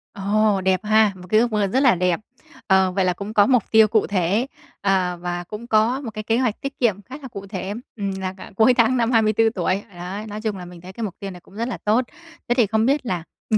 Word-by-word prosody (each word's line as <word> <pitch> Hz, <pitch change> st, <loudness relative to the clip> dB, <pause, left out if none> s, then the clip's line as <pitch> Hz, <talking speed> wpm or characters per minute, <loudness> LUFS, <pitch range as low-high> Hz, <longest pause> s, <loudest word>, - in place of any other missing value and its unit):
Ồ, 205 Hz, 0 st, +1 dB
đẹp 185 Hz, 0 st, +1 dB
ha! 215 Hz, -1 st, +4 dB
Một 180 Hz, 0 st, -12 dB
cái 215 Hz, +2 st, +4 dB
ước 235 Hz, -1 st, +1 dB
mơ 210 Hz, -2 st, +1 dB
rất 250 Hz, +7 st, +1 dB
là 255 Hz, -8 st, +5 dB
đẹp. 180 Hz, -1 st, +1 dB, 0.5 s
Ờ, 190 Hz, -1 st, +4 dB
vậy 185 Hz, 0 st, 0 dB
là 180 Hz, -, +2 dB
cũng 200 Hz, +4 st, -7 dB
có 205 Hz, -2 st, +5 dB
mục 250 Hz, -5 st, +3 dB
tiêu 220 Hz, -1 st, +7 dB
cụ 215 Hz, 0 st, +1 dB
thể, 200 Hz, +5 st, 0 dB, 0.3 s
ờ, 185 Hz, -3 st, +1 dB
và 175 Hz, 0 st, -3 dB
cũng 210 Hz, +6 st, -9 dB
có 225 Hz, +3 st, +2 dB
một 240 Hz, -, -5 dB
cái 215 Hz, 0 st, -6 dB
kế 225 Hz, +2 st, +1 dB
hoạch 245 Hz, -4 st, -1 dB
tiết 275 Hz, 0 st, -6 dB
kiệm 210 Hz, -5 st, +1 dB
khá 260 Hz, +7 st, -10 dB
là 265 Hz, -, -7 dB
cụ 200 Hz, -4 st, -9 dB
thể, 195 Hz, 0 st, -4 dB, 0.2 s
ừm, 200 Hz, -2 st, -3 dB
là 185 Hz, 0 st, -3 dB
cả -, -, -11 dB
cuối 225 Hz, +5 st, +5 dB
tháng 240 Hz, +2 st, +3 dB
năm 235 Hz, 0 st, +1 dB
24 225 Hz, -1 st, +3 dB
tuổi. 185 Hz, +2 st, 0 dB
Đấy, 190 Hz, +5 st, -6 dB
nói 210 Hz, +1 st, -6 dB
chung 215 Hz, -3 st, -2 dB
là 180 Hz, -, -8 dB
mình 175 Hz, -1 st, -12 dB
thấy 185 Hz, +1 st, -11 dB
cái 230 Hz, -, -6 dB
mục 200 Hz, -, -4 dB
tiêu 195 Hz, -1 st, -6 dB
này 180 Hz, -, -11 dB
cũng 190 Hz, -, -20 dB
rất 230 Hz, +2 st, -2 dB
là 250 Hz, -, -4 dB
tốt. 225 Hz, +5 st, +3 dB, 0.4 s
Thế 240 Hz, -, +2 dB
thì 240 Hz, -4 st, +3 dB
không 220 Hz, +2 st, +1 dB
biết 275 Hz, +1 st, +1 dB
là, 180 Hz, -7 st, -2 dB, 0.3 s
ừm, 215 Hz, -, +4 dB
210 Hz, 270 wpm, -22 LUFS, 190-225 Hz, 0.5 s, tiêu